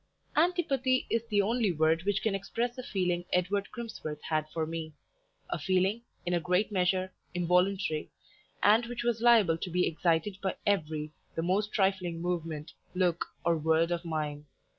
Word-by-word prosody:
Antipathy 290 -6 +2
is 230 0 0
the 205 -2 +3
only 225 -1 +1
word 160 +1 +2
which 205 -1 +1
can 220 - +1
express 230 +5 -2
the 255 - -5
feeling 180 -6 -1
Edward 195 +3 +1
Crimsworth 190 -11 -6
had 155 -1 -1
for 160 0 -2
me 160 -1 -5 0.6
a - - -1
feeling, 190 +4 +1 0.2
in 175 - 0
a 175 - +3
great 180 +5 +1
measure, 185 -1 +1 0.2
involuntary, 180 -2 +1 0.5
and 220 +3 +5
which 240 0 -4
was 235 -2 0
liable 220 -9 +5
to 180 - -4
be 180 +1 +2
excited 170 +4 0
by 190 -2 -1
every, 155 -6 0 0.2
the 165 - -1
most 200 +4 +1
trifling 190 -4 +1
movement, 165 -3 -3 0.2
look, 180 -2 +1 0.2
or 170 0 +4
word 160 +2 +2
of 175 0 -1
mine. 150 -3 -3
180 Hz, 160 wpm, -30 LUFS, 165-210 Hz, 0.6 s, and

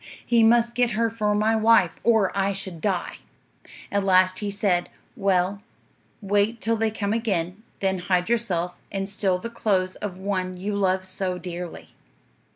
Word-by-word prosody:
He 235 -1 +3
must 235 +1 +4
get 245 -1 +1
her 230 +1 +1
for 210 -2 0
my 215 +2 +2
wife, 220 -5 +4
or 220 -5 +3
I 200 0 +1
should 190 -4 -7
die. 190 -4 -2 0.7
At 200 0 +1
last 185 -1 +4
he 205 - -3
said, 195 -3 0 0.3
"Well, 195 -1 +1 0.6
wait 205 +3 +1
till 230 +1 +1
they 225 0 +1
come 210 -1 -2
again, 195 -4 -1 0.2
then 190 -1 0
hide 180 0 0
yourself 185 -7 0 0.2
and 195 -1 -2
steal 195 -2 0
the 230 +5 -7
clothes 185 -5 0
of 200 -3 -5
the 185 - -13
one 185 -2 -2
you 200 +3 -3
love 190 -1 +1
so 185 -1 -2
dearly." 180 -1 -7
200 Hz, 165 wpm, -24 LUFS, 185-220 Hz, 0.7 s, must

